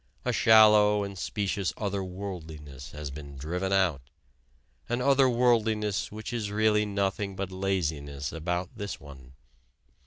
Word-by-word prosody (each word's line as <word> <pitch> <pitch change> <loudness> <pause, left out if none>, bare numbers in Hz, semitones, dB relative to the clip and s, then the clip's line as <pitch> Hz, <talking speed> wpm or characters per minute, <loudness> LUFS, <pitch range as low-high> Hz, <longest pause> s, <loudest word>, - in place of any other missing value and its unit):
A - - +1
shallow 105 -2 +6
and 100 0 -6
specious 100 0 -2
other 100 -2 -2
worldliness 80 -7 -8
has 75 -3 -7
been 70 -1 -9
driven 90 +7 -3
out: 90 -8 +2 0.9
an 120 +1 0
other 135 0 +4
worldliness 110 -5 +1
which 110 +3 -6
is 110 -4 -2
really 105 0 +2
nothing 100 0 -1
but 95 0 -4
laziness 80 -7 -2
about 85 +2 -3
this 100 -1 -5
one. 65 -3 -13
95 Hz, 130 wpm, -28 LUFS, 80-105 Hz, 0.9 s, shallow